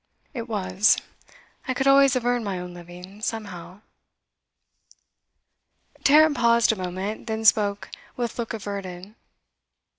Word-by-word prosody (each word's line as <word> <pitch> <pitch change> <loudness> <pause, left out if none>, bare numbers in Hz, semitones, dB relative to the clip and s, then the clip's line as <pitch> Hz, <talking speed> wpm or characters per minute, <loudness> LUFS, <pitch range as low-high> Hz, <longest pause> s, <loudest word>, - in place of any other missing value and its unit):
'It 235 -3 -6
was; 195 0 +2 0.7
I 260 - -1
could 265 - -1
always 275 -1 +5
have 250 -2 -1
earned 245 -1 +1
my 195 -3 -3
own 180 0 -7
living, 180 +3 -12
somehow.' 200 -4 -6 2.2
Tarrant 305 +1 +5
paused 235 -2 +3
a - - -2
moment, 190 +4 -5
then 220 0 -3
spoke 205 -2 +2 0.3
with 240 -1 -4
look 230 - -3
averted. 200 -2 -7
215 Hz, 120 wpm, -24 LUFS, 185-235 Hz, 2.2 s, always